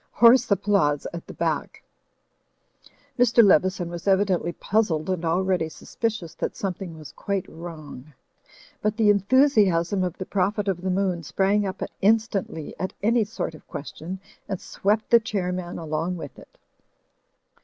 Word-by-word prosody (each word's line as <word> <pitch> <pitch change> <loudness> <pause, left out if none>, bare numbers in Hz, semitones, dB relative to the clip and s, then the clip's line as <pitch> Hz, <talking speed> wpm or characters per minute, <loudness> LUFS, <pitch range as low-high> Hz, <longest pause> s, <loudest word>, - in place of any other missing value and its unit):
(Hoarse 240 +2 +6
applause 195 -8 +2
at 170 - -7
the - - -8
back.) - - -2 1.4
Mr. 240 -1 +6
Leveson 185 -1 +3
was 170 +2 -7
evidently 190 -3 +2
puzzled 190 -4 0
and 180 -2 -2
already 175 0 +1
suspicious 210 0 -4
that - - -4
something 180 -3 -5
was 155 -2 -10
quite 200 -2 -3
wrong. 155 -4 -10 0.7
But 210 +1 0
the 215 -2 +5
enthusiasm 200 -5 +3
of 180 0 -3
the 185 - -5
Prophet 200 +2 0
of 185 -3 -1
the 190 - -2
Moon 185 -2 0
sprang 200 +5 +1
up 190 0 -4 0.2
in 215 +3 +6
stantly 195 -8 -5
at 185 - -3
any 230 +2 +3
sort 210 -5 -4
of 155 - -15
question 160 +6 -7 0.3
and 190 -3 -2
swept 210 +2 -1
the 235 - +8
Chair 200 -5 -2
man 180 -1 -5
along 165 +2 -2
with 145 -4 -9
it. - - -18
190 Hz, 150 wpm, -25 LUFS, 170-205 Hz, 1.4 s, the